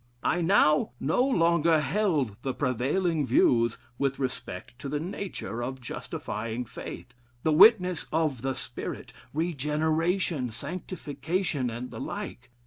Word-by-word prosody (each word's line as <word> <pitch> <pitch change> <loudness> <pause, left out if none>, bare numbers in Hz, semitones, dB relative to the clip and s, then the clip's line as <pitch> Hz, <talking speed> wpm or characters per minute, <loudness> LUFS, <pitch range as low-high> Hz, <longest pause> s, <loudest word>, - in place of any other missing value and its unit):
I 175 - +2
now 160 -7 +4
no 160 - +2
longer 170 - +3
held 150 - +1
the 130 -1 -2
prevailing 145 +6 +1
views 115 -2 +3 0.2
with 135 -1 +1
respect 125 -4 -5
to 140 - -5
the 150 +1 -1
nature 170 - -5
of 130 +2 -4
justifying 115 -1 -4
faith, 125 +2 -8 0.3
the 160 - +3
witness 185 -2 +6
of 155 -6 0
the 135 0 -1
Spirit, - - -6 0.2
regeneration, 160 - 0
sanctification, 155 - -3
and 120 +2 -6
the - - -7
like. 125 0 -6
150 Hz, 125 wpm, -28 LUFS, 125-170 Hz, 0.3 s, witness